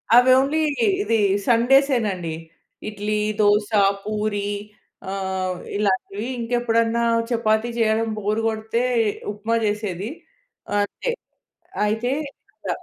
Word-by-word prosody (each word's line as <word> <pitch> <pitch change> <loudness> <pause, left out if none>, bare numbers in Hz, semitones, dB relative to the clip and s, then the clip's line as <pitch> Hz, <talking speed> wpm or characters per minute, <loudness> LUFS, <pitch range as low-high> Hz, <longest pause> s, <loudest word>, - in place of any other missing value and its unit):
అవి 250 +1 +7
ఓన్లీ, 295 +4 +1 0.4
ఇది 225 -1 +1 0.3
సండేసే 260 +3 +4
నండి. 175 -4 -3 0.6
ఇడ్లీ, 210 0 -2 0.2
దోస, 205 0 +3 0.3
పూరి 210 -1 -2 0.6
అహ్, 190 -1 -2 0.2
ఇలాంటివి 205 +2 -1
ఇంకెప్పుడన్నా 230 -1 +1 0.3
చపాతీ 225 -1 +1
జెయడం 225 0 +2
బోర్ 210 +1 -1
కొడితే, 220 +1 -1 0.5
ఉప్మా 220 +3 -2
జెసేది 210 -1 -2 0.7
అంతే. 345 - -3 0.8
అయితే 225 +4 0 0.6
ద - - -3
215 Hz, 95 wpm, -22 LUFS, 205-235 Hz, 0.8 s, అవి